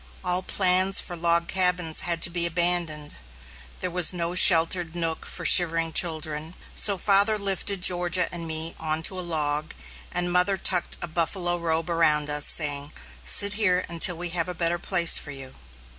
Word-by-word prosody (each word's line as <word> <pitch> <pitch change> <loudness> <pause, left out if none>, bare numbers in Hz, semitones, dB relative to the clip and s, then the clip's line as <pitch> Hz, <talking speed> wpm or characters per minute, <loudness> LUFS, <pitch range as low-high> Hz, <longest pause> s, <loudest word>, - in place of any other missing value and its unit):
All 180 0 +1
plans 185 +1 +2
for 175 - -5
log 170 0 0
cabins 180 -3 0
had 170 -1 -2
to 175 - +3
be 170 0 0
abandoned. 170 -3 -1 0.6
There 180 - -4
was 180 -1 +3
no 170 -1 -4
sheltered 170 -1 +4
nook 165 -2 -4
for - - -6
shivering 165 -2 +4
children, 160 -1 -1 0.2
so 200 -2 +3
father 200 +3 +2
lifted 200 -1 -3
Georgia 175 0 +2
and 170 -1 -5
me 160 +1 -5
on 160 0 -3
to 185 +2 -2
a - - -3
log, 155 -3 -1 0.4
and 175 0 -3
mother 180 +2 +1
tucked 180 -1 0
a - - -5
buffalo 175 +2 -3
robe 165 -1 -3
around 150 -3 0
us, 150 0 +2
saying, 145 -1 +2 0.3
"Sit 200 - +3
here 185 -4 -1
until 170 +1 +1
we 175 +1 -5
have 170 0 -3
a 180 - -7
better 170 +1 -1
place 175 -2 +1
for - - -12
you." 135 -2 -11
170 Hz, 175 wpm, -23 LUFS, 160-180 Hz, 0.6 s, sheltered